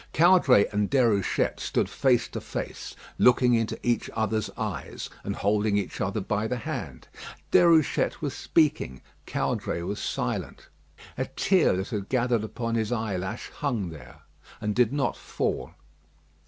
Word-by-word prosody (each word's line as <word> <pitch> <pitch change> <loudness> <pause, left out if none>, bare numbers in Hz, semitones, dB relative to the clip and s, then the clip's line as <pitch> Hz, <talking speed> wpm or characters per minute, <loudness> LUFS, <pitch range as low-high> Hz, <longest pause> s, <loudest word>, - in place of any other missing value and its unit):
Caudray 160 - +6
and 105 -1 0
Déruchette 115 -8 +2
stood - - 0
face 125 -3 +2
to - - -5
face, - - -6 0.2
looking 125 0 +5
into 115 -1 0
each 120 -1 +1
other's 110 -1 0
eyes, - - -5
and - - -3
holding 105 0 +1
each 100 - -3
other 100 +4 -1
by 105 +2 -1
the 125 - -2
hand. 115 - -6 0.4
Déruchette 165 -3 +4
was 145 -4 -3
speaking. 145 - +1 0.3
Caudray 85 - -2
was 100 +4 -3
silent. - - -3 0.5
A - - +1
tear 185 - +2
that 95 - -3
had 105 -4 -4
gathered 125 -3 +1
upon 115 +2 -3
his 110 -1 0
eyelash 110 -2 -3
hung 120 - -2
there 65 -6 -12 0.4
and 105 -1 -1
did 125 +1 +3
not 140 -3 0
fall. - - -3
115 Hz, 140 wpm, -27 LUFS, 105-125 Hz, 0.5 s, Caudray